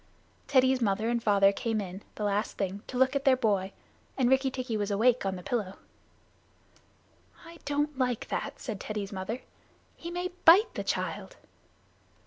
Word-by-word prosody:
Teddy's 260 Hz, -1 st, +3 dB
mother 215 Hz, +1 st, +1 dB
and 235 Hz, 0 st, 0 dB
father 200 Hz, -2 st, +4 dB
came 225 Hz, 0 st, -2 dB
in, 190 Hz, -1 st, -6 dB
the 210 Hz, -, -5 dB
last 205 Hz, +1 st, -1 dB
thing, 195 Hz, +1 st, -3 dB
to 250 Hz, -, -5 dB
look 260 Hz, +2 st, +3 dB
at 275 Hz, -, 0 dB
their 270 Hz, -2 st, +5 dB
boy, 200 Hz, -5 st, 0 dB, 0.5 s
and 255 Hz, -2 st, +2 dB
Rikki 265 Hz, 0 st, +3 dB
tikki 255 Hz, -3 st, -4 dB
was 205 Hz, -1 st, -1 dB
awake 225 Hz, +2 st, +2 dB
on 190 Hz, -, -1 dB
the 180 Hz, -, -9 dB
pillow. 205 Hz, -5 st, -3 dB, 1.7 s
"I 335 Hz, 0 st, -12 dB
don't 290 Hz, +1 st, -1 dB
like 250 Hz, -3 st, -1 dB
that," -, -, -4 dB
said 220 Hz, -6 st, -5 dB
Teddy's 210 Hz, -1 st, -5 dB
mother. 195 Hz, +6 st, -4 dB, 0.5 s
"He 340 Hz, -, -8 dB
may 355 Hz, +1 st, -3 dB
bite 395 Hz, +8 st, +7 dB
the -, -, -4 dB
child." -, -, -3 dB
230 Hz, 165 wpm, -29 LUFS, 200-265 Hz, 1.7 s, bite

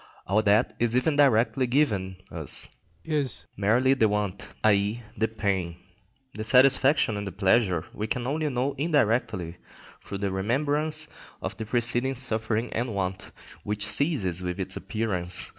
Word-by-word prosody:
All 100 Hz, +3 st, +2 dB
that 105 Hz, +1 st, +3 dB
is 120 Hz, +1 st, +1 dB
even 145 Hz, +4 st, +1 dB
directly 130 Hz, -2 st, +3 dB
given 105 Hz, -9 st, +1 dB, 0.2 s
us 80 Hz, -5 st, -1 dB, 0.4 s
is 150 Hz, -6 st, -2 dB
merely 120 Hz, +6 st, +3 dB
the 115 Hz, -5 st, +3 dB
want, 105 Hz, -2 st, -2 dB, 0.2 s
i.e., 105 Hz, +2 st, +2 dB
the 110 Hz, +2 st, +1 dB
pain. 95 Hz, -6 st, -2 dB, 0.6 s
The 110 Hz, -, -5 dB
satisfaction 130 Hz, -1 st, +4 dB
and 100 Hz, 0 st, -4 dB
the -, -, -4 dB
pleasure 95 Hz, -2 st, +2 dB
we 105 Hz, -, -4 dB
can 120 Hz, +2 st, -2 dB
only 150 Hz, +3 st, -1 dB
know 130 Hz, +1 st, -1 dB
indirectly 115 Hz, -, 0 dB, 0.5 s
through 100 Hz, -, -6 dB
the 100 Hz, -1 st, -2 dB
remembrance 145 Hz, +10 st, 0 dB, 0.3 s
of -, -, -5 dB
the 110 Hz, -1 st, -5 dB
preceding 120 Hz, +3 st, 0 dB
suffering 110 Hz, -2 st, -1 dB
and 115 Hz, -2 st, -2 dB
want, 95 Hz, -1 st, -3 dB, 0.3 s
which 105 Hz, 0 st, -1 dB
ceases 105 Hz, -, +1 dB
with 90 Hz, -1 st, -4 dB
its -, -, 0 dB
appearance. 90 Hz, -6 st, -1 dB
110 Hz, 145 wpm, -26 LUFS, 100-130 Hz, 0.6 s, satisfaction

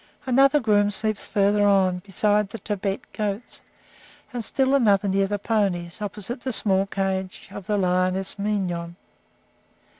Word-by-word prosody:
Another 275 Hz, +3 st, +4 dB
groom 205 Hz, -4 st, +3 dB
sleeps 215 Hz, +1 st, -2 dB
farther 205 Hz, 0 st, +2 dB
on, 190 Hz, -3 st, +3 dB
beside 205 Hz, +2 st, +1 dB
the 230 Hz, -, -7 dB
Tibet 200 Hz, -1 st, -3 dB
goats, 210 Hz, +1 st, -4 dB, 0.7 s
and 240 Hz, -2 st, -3 dB
still 265 Hz, +4 st, +1 dB
another 205 Hz, -7 st, +3 dB
near 195 Hz, 0 st, +1 dB
the 205 Hz, +1 st, -2 dB
ponies, 195 Hz, -4 st, -1 dB
opposite 210 Hz, +4 st, -5 dB
the 260 Hz, -, -3 dB
small 195 Hz, -3 st, +1 dB
cage 190 Hz, -1 st, -3 dB
of 200 Hz, -, -9 dB
the 210 Hz, -, +1 dB
lioness 185 Hz, +1 st, +1 dB
Mignon. 180 Hz, -5 st, -2 dB
200 Hz, 140 wpm, -24 LUFS, 190-215 Hz, 0.7 s, Another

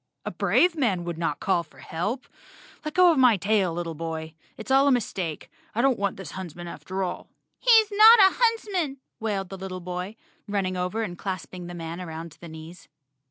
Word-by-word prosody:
"A -, -, -3 dB
brave 355 Hz, -1 st, +2 dB
man 215 Hz, -, 0 dB
would 170 Hz, -1 st, -5 dB
not 150 Hz, -4 st, -1 dB
call 190 Hz, -3 st, +1 dB
for 160 Hz, -, -18 dB
help. 205 Hz, +11 st, -4 dB, 0.6 s
Let 305 Hz, +1 st, -5 dB
go 365 Hz, -1 st, +7 dB
of 310 Hz, -, +1 dB
my 245 Hz, -5 st, +6 dB
tail, 200 Hz, -1 st, +1 dB
little 165 Hz, 0 st, -4 dB
boy. 160 Hz, 0 st, -5 dB, 0.2 s
It's 220 Hz, +4 st, -7 dB
all 270 Hz, +1 st, +5 dB
a -, -, +5 dB
mistake. 190 Hz, -, -2 dB, 0.3 s
I 235 Hz, -, +2 dB
don't 270 Hz, -5 st, +3 dB
want 200 Hz, -1 st, -1 dB
this 185 Hz, -6 st, -8 dB
huntsman 175 Hz, -2 st, -7 dB
after 190 Hz, +2 st, -4 dB
all." 180 Hz, -, -5 dB, 0.3 s
"He's 445 Hz, -3 st, +5 dB
not 435 Hz, +3 st, +9 dB
a 385 Hz, -1 st, +6 dB
huntsman," 410 Hz, -, 0 dB, 0.2 s
wailed 200 Hz, -4 st, -2 dB
the 195 Hz, -, -8 dB
little 185 Hz, -1 st, -5 dB
boy, 180 Hz, +3 st, -5 dB, 0.3 s
running 195 Hz, -2 st, -1 dB
over 180 Hz, +5 st, -2 dB
and 175 Hz, -5 st, -6 dB
clasping 185 Hz, -2 st, -5 dB
the 175 Hz, -, -7 dB
man 165 Hz, +1 st, -6 dB
around 165 Hz, -2 st, -7 dB
the 170 Hz, -, -9 dB
knees. 160 Hz, +2 st, -11 dB
190 Hz, 195 wpm, -26 LUFS, 175-260 Hz, 0.6 s, not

